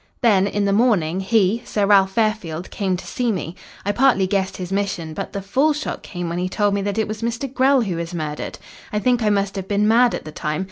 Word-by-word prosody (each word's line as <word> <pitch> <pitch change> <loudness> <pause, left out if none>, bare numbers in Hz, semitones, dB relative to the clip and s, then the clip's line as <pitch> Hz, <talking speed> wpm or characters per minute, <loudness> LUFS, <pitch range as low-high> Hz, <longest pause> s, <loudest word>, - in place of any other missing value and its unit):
"Then 200 -6 +4
in 205 0 -1
the 200 - +2
morning, 195 -7 +2
he, 205 +2 +2
Sir 205 -4 0
Ralph 195 -1 +4
Fairfield, 195 -6 -1
came 190 -3 -1
to - - -9
see 245 -2 -1
me. 175 -4 -4 0.3
I 205 - +2
partly 245 -4 +3
guessed 190 0 -1
his 180 0 -6
mission, 195 -5 -2
but - - -5
the 200 -1 -5
full 270 +10 +2
shock 300 +1 -4
came 175 -2 -5
when 170 +1 -3
he 180 +1 -1
told 205 +1 +1
me 200 - 0
that 200 +1 -2
it 220 - +1
was 215 +1 -5
Mr. 235 +3 -2
Grell 265 0 +4
who 190 -7 -2
was 170 0 -4
murdered. 155 -3 -4 0.3
I 210 - -1
think 245 +2 +2
I 215 - +2
must 200 -1 0
have 190 -1 -4
been 205 +1 +1
mad 235 +2 +4
at - - -7
the 155 - -7
time. 150 +1 -3
200 Hz, 245 wpm, -21 LUFS, 185-225 Hz, 0.3 s, Then